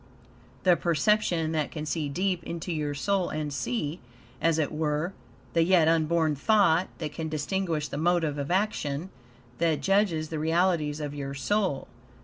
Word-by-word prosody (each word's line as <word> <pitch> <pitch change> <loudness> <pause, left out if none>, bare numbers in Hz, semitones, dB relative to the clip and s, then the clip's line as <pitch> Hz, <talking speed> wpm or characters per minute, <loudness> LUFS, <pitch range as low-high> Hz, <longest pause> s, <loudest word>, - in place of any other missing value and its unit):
The 180 -2 +6
perception 170 -1 +1
that 155 -2 0
can 155 -1 -5
see 155 -2 -2
deep 180 +3 -1
into 170 +1 -4
your 150 -2 -2
soul 195 +5 0
and 150 -2 -3
see, 150 - -2 0.4
as 165 -1 +3
it 155 -3 0
were, 155 +3 -1 0.4
the 165 - +3
yet 170 -2 +4
unborn 160 -1 +2
thought; 185 +1 +3
that 155 -3 -5
can 160 -1 -4
distinguish 155 0 -1
the - - -5
motive 165 -3 +1
of 140 - -3
action; 180 -4 -1 0.5
that 165 -2 +1
judges 195 -6 +2
the 160 - -3
realities 160 -2 +1
of 145 -1 -4
your 140 -1 -5
soul. 185 +1 0
160 Hz, 155 wpm, -27 LUFS, 150-180 Hz, 0.5 s, The